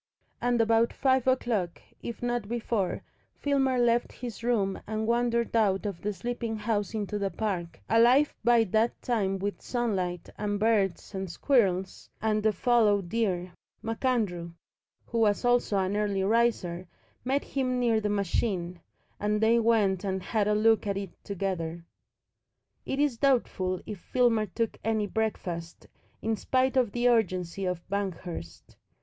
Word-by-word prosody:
And 245 -1 +1
about 225 +1 +3
five 260 -1 +2
o'clock, 225 -9 0 0.2
if 235 0 -6
not 240 -3 -1
before, 225 -4 -1 0.3
Filmer 270 -2 +1
left 240 0 +2
his 235 -3 -7
room 210 -5 0
and 220 +1 -2
wandered 235 0 +1
out 205 -3 +2
of 200 -4 -4
the 210 - -1
sleeping 235 +1 -3
house 210 -1 -2
into 210 -1 -2
the 200 -1 0
park, 180 -3 -3
alive 245 +6 +5
by 235 0 +5
that 220 +3 +1
time 200 -6 0
with 200 +1 -4
sunlight 190 -8 -2
and 205 -1 -1
birds 210 -3 +1
and 190 -1 -4
squirrels 190 - +1
and 215 0 +1
the 220 +1 +3
fallow 220 -2 +3
deer. 180 -2 -1 0.3
MacAndrew, 220 -8 -1 0.5
who 230 - -2
was 215 +1 +2
also 245 -4 +2
an 190 +1 0
early 205 -2 0
riser, 195 -5 +1 0.4
met 270 +3 0
him 255 -2 -1
near 230 -3 +2
the 210 - -1
machine, 190 -3 -1 0.4
and 210 +1 0
they 225 +2 +4
went 215 -5 +2
and 190 -2 -2
had 215 -3 0
a 210 - +2
look 220 0 +3
at 200 -1 -1
it 195 -2 -5
together. 170 -4 -3 1.0
It 270 - -2
is 290 -5 +2
doubtful 190 -9 +1
if 210 -3 -6
Filmer 230 -1 +2
took 225 +4 -3
any 220 -1 +1
breakfast, 185 -6 -3 0.4
in 225 0 +1
spite 260 +3 +1
of 250 -5 +2
the 240 +2 +1
urgency 190 -5 +1
of 180 -2 -3
Banghurst. 185 - -5
215 Hz, 150 wpm, -28 LUFS, 195-235 Hz, 1.0 s, alive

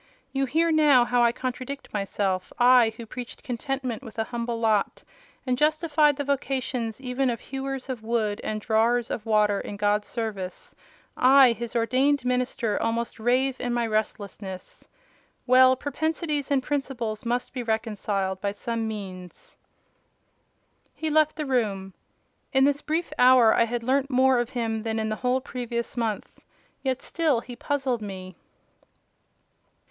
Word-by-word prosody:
You 270 0 +1
hear 325 +5 +2
now 295 -6 +5
how 245 0 +2
I 235 -1 +5
contradict 255 +3 -6
myself. 195 -2 -2
I, 245 -2 +6
who 235 - -7
preached 245 +2 -8
contentment 260 -2 -3
with 225 -5 -11
a 225 - +1
humble 235 0 -4
lot, 220 -3 +1 0.4
and 255 -1 +1
justified 305 -1 +3
the 285 - -3
vocation 265 -4 -1
even 260 0 -1
of 235 -2 -2
hewers 270 0 -5
of 255 -4 -4
wood 220 -2 -1
and 215 0 -2
drawers 230 +2 +1
of 220 - -4
water 210 -2 +3
in 205 - -7
God's 205 0 +1
service—I, 235 +4 +1
His 235 0 -5
ordained 255 +4 +2
minister, 250 -3 0
almost 230 +1 -2
rave 255 +3 +1
in 245 -1 -1
my 240 -1 +1
restlessness. 205 -3 -4 0.6
Well, 255 +1 +6
propensities 300 +1 -2
and 275 -2 +2
principles 250 -7 -3
must 245 +1 -2
be 255 - -3
reconciled 210 -4 -2
by 200 -1 -1
some 230 +1 -3
means." 185 -4 -8 1.4
He 315 -1 -3
left 310 0 +3
the 305 - -3
room. 205 -8 -1 0.6
In 265 0 +5
this 285 +1 +2
brief 320 +4 -2
hour 250 -3 +7
I 230 - +4
had 235 0 -3
learnt 270 +3 +1
more 260 -1 +4
of 240 0 -1
him 225 -4 -2
than 225 0 -2
in 220 0 -1
the 215 - -2
whole 255 +1 0
previous 240 -2 -4
month: 225 -4 -3 0.4
yet 265 -1 -2
still 310 -8 +1
he 245 0 -9
puzzled 265 -4 -1
me. 185 -3 -7
245 Hz, 150 wpm, -26 LUFS, 220-270 Hz, 1.4 s, hour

